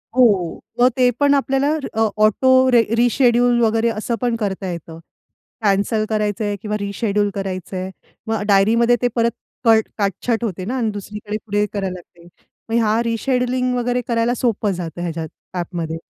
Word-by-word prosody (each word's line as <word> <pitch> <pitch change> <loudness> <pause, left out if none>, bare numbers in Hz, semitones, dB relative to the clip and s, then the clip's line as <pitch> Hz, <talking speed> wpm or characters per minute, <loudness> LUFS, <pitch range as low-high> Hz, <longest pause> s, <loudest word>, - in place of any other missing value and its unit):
हो. 205 -9 +3 0.2
मग 250 +1 +6
ते 250 -1 +5
पण 285 0 +4
आपल्याला 275 0 +1 0.2
अ, 220 0 +2 0.2
ऑटो 260 +4 +4
रे 240 -1 +6
रिशेड्यूल 240 0 +3
वगैरे 225 0 +2
असं 225 +1 -2
पण 240 -2 +1
करता 200 -4 -3
येतं. 165 -1 -8 0.6
कॅन्सल 205 +2 +1
करायचंय 210 -1 -1
किंवा 210 0 -2
रिशेड्यूल 205 0 -1
करायचं 190 -1 -4
आहे. 185 +1 -4 0.4
मग 220 -2 -1
डायरीमध्ये 225 +4 +4
ते 245 - +3
परत 235 -1 +2 0.3
कट 225 -1 +5
काटछट 215 +3 -1
होते 185 -5 -3
ना 250 +6 -2
आणि 230 -3 0
दुसरीकडे 210 +1 -6
पुढे 205 -1 +1
करायला 195 -3 -2
लागते. 175 -1 -14 0.4
मग 225 - 0
ह्या 225 -1 +2
रिशेड्यूलिंग 250 +2 0
वगैरे 245 0 0
करायला 235 0 +1
सोपं 225 -4 0
जातं 175 -1 -6
ह्याच्यात 165 -2 -4 0.2
ॲपमध्ये. 170 -2 -4
220 Hz, 155 wpm, -20 LUFS, 195-240 Hz, 0.6 s, मग